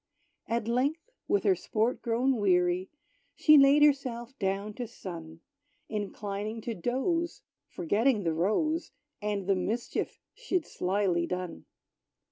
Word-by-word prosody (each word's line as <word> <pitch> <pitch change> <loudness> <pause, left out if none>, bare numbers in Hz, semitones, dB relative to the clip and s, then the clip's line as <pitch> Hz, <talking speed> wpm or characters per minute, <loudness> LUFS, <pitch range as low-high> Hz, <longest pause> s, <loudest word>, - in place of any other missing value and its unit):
At 230 -1 -1
length, 285 - 0 0.2
with 405 - +2
her 390 - +5
sport 230 -8 -1
grown 245 +2 +1
weary, 180 -2 +2 0.5
She 305 - +6
laid 280 +1 +7
herself 260 -4 +1
down 195 +2 -1
to 245 +2 -5
sun, 165 -7 -9 0.5
Inclining 210 +1 -4
to 230 - -3
doze, 265 - -1 0.2
forgetting 210 +6 +1
the 165 -2 +1
rose, 260 - 0 0.3
And 205 -2 -2
the 195 - +3
mischief 220 +6 -2
she'd 380 -10 -2
slily 180 -2 0
done. 180 - -5
220 Hz, 120 wpm, -29 LUFS, 190-270 Hz, 0.5 s, laid